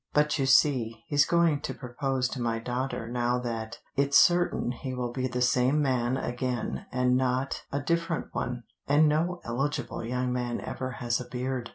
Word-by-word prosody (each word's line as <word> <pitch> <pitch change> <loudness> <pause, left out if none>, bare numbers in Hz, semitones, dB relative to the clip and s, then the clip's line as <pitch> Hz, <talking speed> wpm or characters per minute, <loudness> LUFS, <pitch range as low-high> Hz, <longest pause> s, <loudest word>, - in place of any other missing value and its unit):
But 150 0 +2
you 135 - +1
see, 120 -5 +3
he's 145 -1 +3
going 170 -4 +3
to - - -4
propose 130 0 -2
to 130 - -5
my 115 -1 0
daughter 125 0 -3
now 120 +1 0
that 115 -2 -4 0.2
it's 140 0 +4
certain 175 -7 +4
he 130 +1 -5
will 125 -1 -2
be 130 +1 -1
the 125 0 -1
same 125 +3 +3
man 130 -3 +1
again 125 -1 -3
and 125 0 +2
not 130 +1 0
a 140 - -1
different 165 +2 -1
one, 125 -1 -3 0.2
and 150 +2 +5
no 170 +4 0
eligible 135 +4 -2
young 125 +2 -1
man 120 -1 -2
ever 130 -1 -5
has 120 0 -1
a - - -6
beard. 125 -1 -3
125 Hz, 180 wpm, -28 LUFS, 120-140 Hz, 0.2 s, and